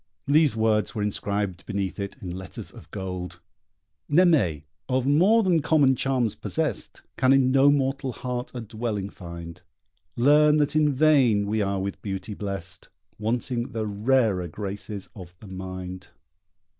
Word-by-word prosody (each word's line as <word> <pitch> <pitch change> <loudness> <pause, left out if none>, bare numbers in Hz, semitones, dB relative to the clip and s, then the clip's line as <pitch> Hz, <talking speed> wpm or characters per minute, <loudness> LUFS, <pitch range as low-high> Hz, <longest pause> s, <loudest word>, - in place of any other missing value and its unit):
These 150 -2 +4
words 110 0 +1
were 105 - -1
inscribed 100 -2 -2
beneath 100 -2 -3
it 100 0 -4
in 90 -3 -5
letters 95 0 -8
of - - -14
gold: 90 -1 -6 0.7
Naimée, 145 - +3 0.3
of 130 0 +1
more 185 +11 +4
than 175 -4 +3
common 145 -4 +4
charms 125 -4 0
possest, - - -3
Can 130 0 +4
in 130 -1 +4
no 135 +1 +5
mortal 135 -1 0
heart 125 0 -4
a 120 - -4
dwelling 110 -3 -4
find. 85 -2 -9 0.5
Learn 150 +4 +5
that 145 0 +1
in 150 -1 +4
vain 130 -8 +4
we 105 +1 0
are 100 -1 0
with 100 +1 -4
beauty 100 +1 -5
blest, 100 -4 -6 0.3
Wanting 120 +3 -2
the 110 -1 -2
rarer 105 -3 +1
graces 100 +2 -6
of 90 -3 -11
the - - -13
mind. 95 -1 -7
110 Hz, 145 wpm, -25 LUFS, 95-135 Hz, 0.7 s, no